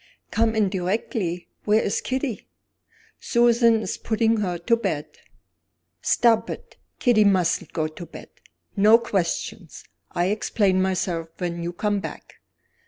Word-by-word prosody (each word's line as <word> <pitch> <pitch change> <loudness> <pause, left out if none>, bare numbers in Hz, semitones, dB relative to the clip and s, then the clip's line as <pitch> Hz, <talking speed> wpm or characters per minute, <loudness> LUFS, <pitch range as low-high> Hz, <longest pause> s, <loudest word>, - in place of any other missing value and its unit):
"Come 225 0 +1
in 210 -3 +2
directly! 185 -1 -2 0.2
Where 215 +1 +3
is 200 - -1
Kitty?" 260 -4 -3 0.7
"Susan 235 -1 +3
is - - -4
putting 225 0 +1
her 185 -4 -1
to 170 +7 +2
bed." 155 -10 -2 1.0
"Stop 230 -2 +3
it! - - -8 0.2
Kitty 240 -4 +4
mustn't 180 -4 +2
go 155 -1 -1
to 165 +2 -10
bed. - - -11 0.5
No 215 +2 +7
questions. 200 -3 -3 0.3
I'll 175 +2 +1
explain 200 -3 +1
myself 180 -3 -1
when 170 -2 -3
you 170 +1 -3
come 205 +3 -1
back." - - -9
205 Hz, 130 wpm, -24 LUFS, 175-225 Hz, 1.0 s, No